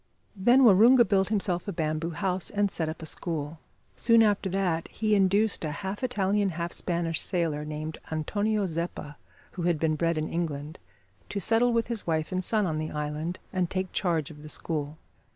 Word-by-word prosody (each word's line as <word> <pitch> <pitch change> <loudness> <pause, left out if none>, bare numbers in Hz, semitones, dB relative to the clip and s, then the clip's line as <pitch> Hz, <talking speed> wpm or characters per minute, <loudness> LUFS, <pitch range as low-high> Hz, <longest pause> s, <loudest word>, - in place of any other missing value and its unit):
Then 240 +7 +5
Waroonga 235 +3 +7
built 195 -2 +2
himself 195 -4 -1
a - - -1
bamboo 160 -1 -2
house, 185 +2 -1
and 205 -1 0
set 160 -2 -2
up 160 - -7
a - - -5
school. 155 -1 -3 0.4
Soon 230 -1 +5
after 205 -2 +1
that 180 -3 0
he 215 -1 -1
induced 200 +1 +2
a 155 - -1
half 190 - -5
Italian, 205 -4 +1
half 170 0 -3
Spanish 170 -2 -1
sailor, 165 -5 -1
named 155 +1 -5
Antonio 205 +7 0
Zeppa, 165 -4 -4 0.3
who 180 - -6
had 170 -2 +1
been 160 0 +1
bred 165 +1 0
in 155 0 -1
England, 155 -3 -4 0.5
to 200 - -3
settle 230 +5 +3
with 230 -1 +1
his 230 -5 -4
wife 160 -1 0
and 185 0 -1
son 215 +1 +1
on 155 -3 -1
the 155 0 -3
island, 150 +3 -3 0.2
and 180 -2 0
take 185 -1 -2
charge 165 -6 -1
of 150 -1 -12
the 150 - -10
school. 150 -1 -3
175 Hz, 190 wpm, -27 LUFS, 155-205 Hz, 0.5 s, Waroonga